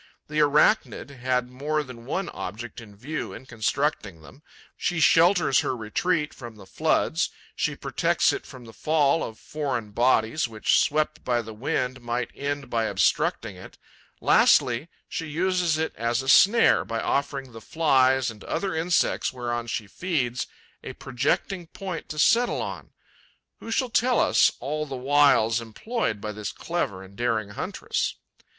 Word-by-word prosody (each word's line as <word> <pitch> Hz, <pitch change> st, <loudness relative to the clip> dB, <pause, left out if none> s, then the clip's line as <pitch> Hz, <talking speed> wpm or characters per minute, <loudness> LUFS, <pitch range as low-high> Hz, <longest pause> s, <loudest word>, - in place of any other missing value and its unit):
The 150 Hz, 0 st, -1 dB
Arachnid 150 Hz, +2 st, +2 dB
had 125 Hz, -1 st, -1 dB
more 150 Hz, +4 st, -1 dB
than 125 Hz, -3 st, -12 dB
one 190 Hz, +5 st, -2 dB
object 115 Hz, +5 st, -7 dB
in 105 Hz, -3 st, -14 dB
view 145 Hz, +9 st, -5 dB
in -, -, -10 dB
constructing 110 Hz, -, -2 dB
them: 135 Hz, -, -15 dB, 0.3 s
she 175 Hz, -2 st, -1 dB
shelters 165 Hz, -2 st, +5 dB
her 130 Hz, -, -1 dB
retreat 150 Hz, -, -1 dB
from 120 Hz, -3 st, -10 dB
the 100 Hz, -, -13 dB
floods; -, -, 0 dB, 0.3 s
she -, -, -1 dB
protects -, -, +1 dB
it -, -, -4 dB
from 125 Hz, -2 st, -12 dB
the 115 Hz, -, -12 dB
fall 155 Hz, +2 st, +2 dB
of 110 Hz, -, -6 dB
foreign 135 Hz, -8 st, -4 dB
bodies 120 Hz, +3 st, +2 dB
which, 110 Hz, -2 st, +2 dB
swept 155 Hz, +1 st, 0 dB
by 120 Hz, -1 st, 0 dB
the 110 Hz, 0 st, -9 dB
wind, 125 Hz, +2 st, -2 dB
might 120 Hz, 0 st, -3 dB
end 140 Hz, 0 st, -4 dB
by 115 Hz, -2 st, 0 dB
obstructing -, -, 0 dB
it; -, -, -13 dB, 0.4 s
lastly, 125 Hz, +6 st, +4 dB, 0.2 s
she 165 Hz, -, -4 dB
uses 175 Hz, +1 st, +1 dB
it 160 Hz, 0 st, -2 dB
as 120 Hz, +3 st, -1 dB
a -, -, -8 dB
snare 205 Hz, -, +6 dB
by 115 Hz, -1 st, -3 dB
offering 140 Hz, -1 st, -2 dB
the 115 Hz, -1 st, -11 dB
Flies 130 Hz, -4 st, +2 dB
and 105 Hz, -2 st, -13 dB
other 195 Hz, -3 st, -2 dB
insects 165 Hz, +2 st, +1 dB
whereon 120 Hz, -2 st, -3 dB
she 115 Hz, -2 st, -3 dB
feeds 125 Hz, -, -2 dB, 0.4 s
a -, -, -6 dB
projecting 170 Hz, +7 st, -2 dB
point 185 Hz, 0 st, -7 dB
to 155 Hz, -, -6 dB
settle 235 Hz, +10 st, +3 dB
on. -, -, -7 dB, 0.7 s
Who -, -, -9 dB
shall 240 Hz, +2 st, 0 dB
tell 245 Hz, +1 st, +3 dB
us -, -, +4 dB
all 150 Hz, +4 st, -3 dB
the 135 Hz, -, -5 dB
wiles 130 Hz, -4 st, +3 dB
employed 115 Hz, -, -3 dB
by 105 Hz, +1 st, -4 dB
this 105 Hz, -1 st, -5 dB
clever 110 Hz, -, -3 dB
and 95 Hz, +1 st, -15 dB
daring 110 Hz, -3 st, -1 dB
huntress? -, -, -3 dB
130 Hz, 155 wpm, -25 LUFS, 115-155 Hz, 0.7 s, snare